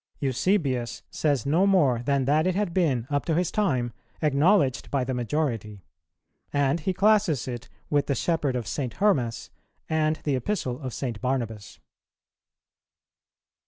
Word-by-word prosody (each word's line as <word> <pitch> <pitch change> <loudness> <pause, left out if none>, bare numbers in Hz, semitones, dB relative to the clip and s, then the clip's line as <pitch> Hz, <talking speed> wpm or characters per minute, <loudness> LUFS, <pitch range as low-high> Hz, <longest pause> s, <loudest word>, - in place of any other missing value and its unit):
Eusebius 130 - 0
says 145 -6 0
no 165 +8 +3
more 145 -12 +3
than 135 +1 +1
that 155 +5 +3
it 185 - +1
had 200 -4 -1
been, 145 -11 +1
up 145 0 +1
to 165 - 0
his 175 0 +1
time, 130 - 0 0.3
acknowledged 150 -1 +3
by 140 -2 0
the 130 +1 -2
majority; 115 - -2 0.7
and 145 +2 +1
he 180 +4 -1
classes 195 - +2
it 120 -1 -6 0.2
with 145 -1 +2
the 140 - +1
Shepherd 150 -2 0
of 120 -2 -2
St. 125 +2 -3
Hermas 130 - 0 0.4
and 155 -1 +1
the 145 -3 +1
Epistle 130 - -2
of 130 -2 -4
St. 120 -6 -4
Barnabas. 115 -6 -3
140 Hz, 145 wpm, -26 LUFS, 125-165 Hz, 0.7 s, no